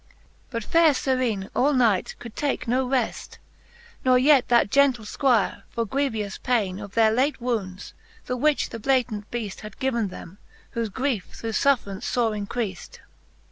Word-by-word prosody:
But 230 -3 -4
faire 325 +3 +4
Serene 250 -7 -1
all 285 +3 +3
night 230 -8 +2
could 235 -2 -10
take 285 -4 -2
no 255 +2 +1
reft, 255 -3 -2 0.7
Ne 255 -1 +5
yet 270 0 +5
that 235 -4 +3
gentle 270 -5 +3
Squire, 230 -3 +1
for 230 0 -2
grievous 225 -5 -2
paine 205 -7 0
Of 200 -1 -9
their 225 -1 +5
late 265 +5 +1
woundes, 205 -6 -3 0.3
the 250 - -2
which 295 +4 +1
the 230 - -7
Blatant 235 -4 0
Beaft 220 -5 -5
Had 215 -1 -10
given 235 -5 0
them, 185 0 -10 0.3
whofe 230 -3 -2
griefe 255 -4 -1
through 225 - -4
fuifraunce 220 -6 +1
fore 235 -3 +1
increaft, 210 -2 -4
XL. - - -16
235 Hz, 160 wpm, -24 LUFS, 210-260 Hz, 0.7 s, Ne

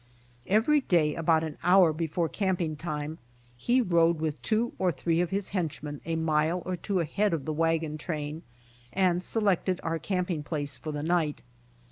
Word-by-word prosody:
Every 230 +9 +4
day 160 - +2
about 160 0 +2
an 155 -2 -6
hour 180 -2 +5
before 165 +1 -1
camping 180 -5 -1
time 150 -1 -4 0.4
he 240 - +2
rode 170 -5 +3
with 155 -1 -2
two 230 +2 0
or 185 -1 +2
three 165 +4 0
of 175 - 0
his 195 +1 -1
henchmen 150 -6 -3
,a 165 0 -1
mile 160 +2 +1
or 185 - -2
two 185 +1 -1
ahead 200 +5 0
of 145 - -6
the 155 - -2
wagon 160 -1 0
train 155 -1 -4 0.5
and 180 -2 +2
selected 195 -4 +1
our 165 0 -1
camping 180 -4 -1
place 145 -2 -3
for 155 - -6
the 145 0 -4
night. 160 -3 0
165 Hz, 170 wpm, -28 LUFS, 155-185 Hz, 0.5 s, hour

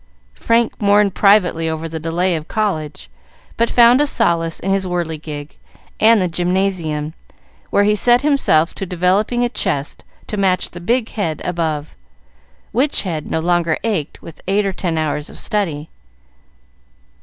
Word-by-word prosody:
Frank 230 - 0
mourned 205 -1 +3
privately 180 -5 +3
over 160 +1 -4
the 160 0 -5
delay 170 +3 0
of 155 0 -5
college, 190 -9 -3 0.5
but 230 0 +1
found 240 +3 +5
a 295 - +2
solace 165 - 0
in 195 - -2
his 195 -1 0
whirligig 160 -4 -5 0.4
and 225 0 +5
the 185 - +1
Gymnasium, 175 -4 -1 0.6
where 200 - +3
he 210 +1 +3
set 240 +4 +4
himself 270 - +2
to 195 - -6
developing 190 +7 +1
a - - +2
chest 165 - -3 0.2
to 210 - -5
match 190 -2 +1
the 175 - -9
big 230 +5 0
head 165 -8 -3
above, 160 -4 -2 0.8
which 270 +6 +2
head 160 -6 -4
no - - 0
longer 170 -1 +1
ached 200 -10 -3
with 165 -2 -12
eight 200 +2 +1
or 195 - -1
ten 170 -3 -2
hours 150 -1 -2
of - - -12
study. 160 -8 -2
180 Hz, 155 wpm, -18 LUFS, 160-210 Hz, 0.8 s, found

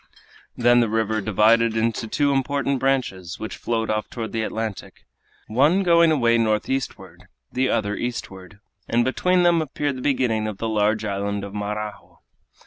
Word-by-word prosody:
Then 120 0 +4
the 115 -2 +2
river 110 0 0
divided 110 +3 +3
into 115 0 -1
two 145 +5 +1
important 140 0 0
branches, 120 -10 -1
which 110 - -5
flowed 115 -2 -2
off 110 0 -2
toward 115 -2 -5
the 115 - -2
Atlantic, 110 -2 -5 0.4
one 145 - +3
going 170 -2 +5
away 120 -6 +3
northeastward, 115 +4 -2 0.2
the 130 +1 0
other 105 -1 0
eastward, 100 -5 -6 0.3
and 120 +1 +2
between 180 +7 +2
them 170 -1 +4
appeared 145 -2 -3
the - - -7
beginning 120 -6 0
of 105 -2 -5
the 115 - -3
large 110 0 +1
island 100 0 -2
of 100 0 -7
Marajo. 105 0 -5
115 Hz, 155 wpm, -23 LUFS, 105-130 Hz, 0.4 s, going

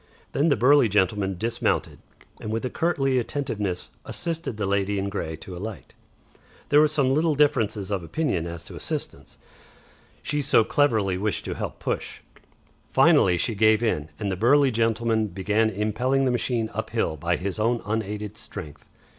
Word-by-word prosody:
Then 145 +4 +1
the 145 - +4
burly 125 +1 +5
gentleman 100 -1 +1
dismounted, 115 +5 -1 0.4
and 110 - -5
with 115 +3 -2
a 125 - -3
courtly 135 -6 +1
attentiveness 110 -8 -3
assisted 165 -8 -3
the 105 - -1
lady 100 +1 0
in 100 0 -1
grey 80 -5 -4
to 90 +4 -10
alight. 100 +2 -7 0.8
There 145 +1 +6
was 155 -1 +3
some 140 -4 +2
little 155 +1 +2
difference 115 -7 +2
of 100 -3 -1
opinion 85 - -1
as 85 -1 -6
to - - -10
assistance, 70 0 -6 0.9
she 150 0 -1
so 120 -4 +4
clearly 110 -9 +1
wished 105 0 -2
to - - -3
help - - -5
push. - - -4 0.7
Finally 90 -1 +5
she 115 - 0
gave 110 +2 +3
in, 80 -9 0
and 100 -2 -2
the - - -1
burly 135 +7 +4
gentleman 115 -1 +1
began 105 +4 +1
impelling 115 +6 0
the 130 - +2
machine 120 -2 -1
up - - -4
hill 80 - -1
by 85 +3 0
his 95 +3 -4
own 115 +2 +1
unaided 105 -1 -3
strength. 75 -6 -9
110 Hz, 165 wpm, -25 LUFS, 95-130 Hz, 0.9 s, There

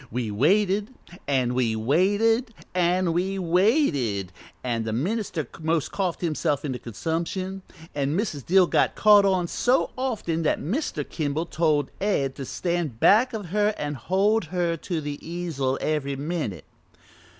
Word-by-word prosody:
we 115 -2 -3
waited, 195 - +2 0.4
an' 130 -3 +1
we 120 -3 +1
waited, 205 - +2 0.2
an' 180 -1 +2
we 190 +3 -1
waited, 165 - +1 0.3
an' 115 -2 -1
the 110 - -3
minister 165 - -2
most 160 -1 0
coughed 185 -4 -2
himself 155 -3 -1
into 130 -3 -3
consumption, 170 - -3 0.3
an' 145 +2 -1
Mrs. 175 - -2
Dill 185 +5 +5
got - - +1
caught 205 -1 +6
on 185 -3 +2
so 250 +8 +1
often 220 -11 -2
that 160 - +1
Mr. 185 - -2
Kimball 155 +1 -2
told 150 -3 +1
Ed 140 -10 +1
to 135 - -5
stand 170 -7 -2
back 225 - +5
of 205 -6 -5
her 210 +2 +1
an' 145 0 -3
hold 190 - +1
her 170 0 -1
to 165 0 -4
the 145 -1 -5
easel 160 -6 -2
every 145 -3 -1
minute. 145 - -4
170 Hz, 145 wpm, -25 LUFS, 140-195 Hz, 0.4 s, caught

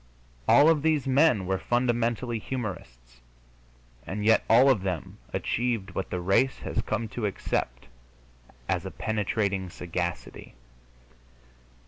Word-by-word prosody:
All 145 +2 +7
of 160 -2 +4
these 155 -2 +1
men 135 - +3
were 95 0 -1
fundamentally 120 -1 0
humorists, 65 - -7 0.8
and 105 +6 -4
yet 110 - +5
all 120 +4 +6
of 110 -8 +1
them 90 -5 -4
achieved 120 -4 -1
what 95 - -4
the 90 - -3
race 95 +9 +2
has - - -2
come 110 +1 -2
to 110 -1 -2
accept - - -3 0.8
as - - 0
a - - -5
penetrating 100 -3 -2
sagacity. 85 -4 -5
110 Hz, 120 wpm, -27 LUFS, 95-125 Hz, 0.8 s, All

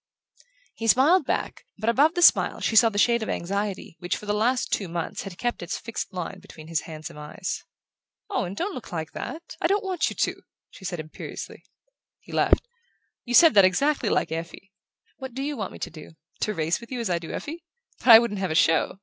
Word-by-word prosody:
He 225 - -4
smiled 285 - +5
back, - - -3
but 215 +2 -5
above 285 +8 +4
the 350 - +2
smile - - +5
she 225 - -1
saw 230 +1 +7
the 205 - -6
shade 235 +2 +3
of 220 - -3
anxiety 195 -1 -3
which, 175 0 -2
for - - -10
the 205 - 0
last 245 +4 +1
two 195 - 0
months, 170 -1 -4
had 195 -3 -8
kept 240 +2 -2
its 175 - -3
fixed 230 -1 -5
line 185 +1 -5
between 165 -5 -13
his 165 -2 0
handsome 155 0 -8
eyes. 150 - -5 0.6
"Owen, 200 - -2
don't 380 - -2
look 250 - -8
like 160 -2 -4
that! 335 +1 -7
I - - +3
don't 400 +3 +1
want 370 -4 0
you - - -7
to!" - - -1 0.3
she 190 - -13
said 175 -2 -3
imperiously. 155 0 -8 0.6
He - - -15
laughed. - - +2 0.6
"You 245 0 0
said 330 -1 +8
that 200 -2 +7
exactly 275 +11 +2
like - - 0
Effie. 165 +4 -6 0.5
What 265 -3 -8
do 270 - -3
you 295 +1 -2
want 205 -7 -4
me - - -10
to 180 - -5
do? 155 0 -12 0.3
To 215 - -1
race 165 +3 0
with 235 - -12
you 255 - -3
as 225 -6 -2
I 170 - +1
do 165 - -8
Effie? 320 +2 -6 0.4
But - - -9
I 230 -2 +12
shouldn't 225 -3 0
have 190 -1 -1
a 155 - -2
show!" 160 +3 +3
210 Hz, 220 wpm, -25 LUFS, 175-260 Hz, 0.6 s, I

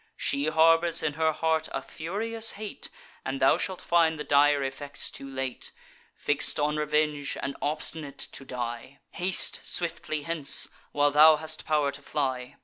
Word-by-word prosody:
She 140 +2 0
harbours 165 +2 +4
in 150 - 0
her 160 +1 +2
heart 160 0 0
a - - -3
furious 225 +7 -3
hate, 210 0 -5 0.3
And 135 0 -3
thou 135 - +4
shalt 185 -2 -3
find 165 -2 +3
the - - -2
dire 145 0 +4
effects 140 +2 -4
too 135 - -8
late; 130 -1 -5 0.4
Fix'd 145 +1 0
on 150 +1 +1
revenge, 150 -1 0
and 140 0 -3
obstinate 150 -1 -3
to 135 - -6
die. 125 +1 -5
Haste 185 +1 0
swiftly 155 -3 -1
hence, 165 -3 +1 0.2
while 145 0 +3
thou 155 +2 +8
hast 155 +1 -4
pow'r 150 -3 +2
to 140 - -8
fly. 130 -4 -2
150 Hz, 155 wpm, -28 LUFS, 140-160 Hz, 0.4 s, thou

